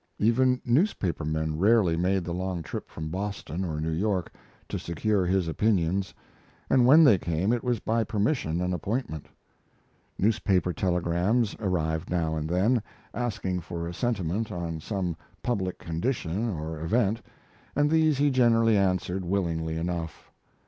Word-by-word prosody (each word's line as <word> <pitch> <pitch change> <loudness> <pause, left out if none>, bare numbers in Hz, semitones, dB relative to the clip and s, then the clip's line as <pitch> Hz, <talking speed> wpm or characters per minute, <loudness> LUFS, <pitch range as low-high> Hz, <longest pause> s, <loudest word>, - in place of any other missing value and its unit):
Even 125 +4 +3
newspaper 120 - +1
men 80 0 -2
rarely 100 -4 +4
made 90 +2 +1
the 85 0 -4
long 90 -1 -3
trip - - -6
from 80 0 -6
Boston 95 -1 -4
or 80 -4 -3
New 80 +1 -2
York 95 +1 -1 0.3
to - - -3
secure 95 +3 0
his 95 -1 +1
opinions, 95 0 +1 0.6
and 125 -2 +5
when 155 +5 +8
they 110 - +6
came 85 +7 0
it 120 - -1
was 125 -3 0
by 115 +2 0
permission 100 - 0
and 90 0 0
appointment. 90 - -3 0.9
Newspaper 95 -4 +1
telegrams 90 +6 +1
arrived 85 -5 -1
now 80 -3 0
and 80 0 -3
then, 105 +8 +2 0.3
asking 105 -6 -2
for 85 0 -5
a 85 - -5
sentiment 105 -1 -1
on 85 -3 -4
some 90 -1 -3 0.3
public 95 -7 -1
condition 95 +3 -2
or 80 -4 -4
event, 110 +6 +1 0.5
and 145 +1 +2
these 160 -3 +3
he 145 +1 +3
generally 115 -3 +4
answered 95 -1 +1
willingly 85 -4 -1
enough. 85 -1 -4
95 Hz, 145 wpm, -27 LUFS, 85-115 Hz, 0.9 s, when